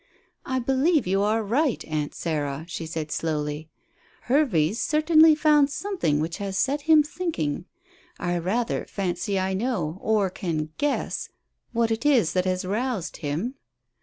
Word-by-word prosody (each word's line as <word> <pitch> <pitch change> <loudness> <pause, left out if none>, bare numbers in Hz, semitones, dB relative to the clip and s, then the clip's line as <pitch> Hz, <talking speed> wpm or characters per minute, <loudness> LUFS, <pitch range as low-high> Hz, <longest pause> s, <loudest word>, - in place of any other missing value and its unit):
"I 260 - 0
believe 270 +4 +2
you 195 +2 +1
are 215 +2 +1
right, 250 +5 0
Aunt 150 -2 -3
Sarah," 150 -2 -2
she 165 -1 -5
said 160 -1 -4
slowly. 150 0 -2 0.5
"Hervey's 230 - +2
certainly 310 +1 +5
found 300 -2 +4
something 305 - -1
which 165 +2 -2
has 195 -1 -3
set 285 +6 0
him 310 -1 +7
thinking. 290 - -3 0.5
I 175 0 -1
rather 225 +8 -1
fancy 195 0 -2
I 190 0 -1
know 190 -6 -2
or 210 -4 +1
can 155 -5 -3
guess 290 -1 -1 0.4
what 230 -1 +1
it 225 +2 -1
is 245 - +3
that 185 0 +1
has 185 0 -1
roused 215 -1 -2
him." 165 - -3
200 Hz, 145 wpm, -25 LUFS, 165-270 Hz, 0.5 s, him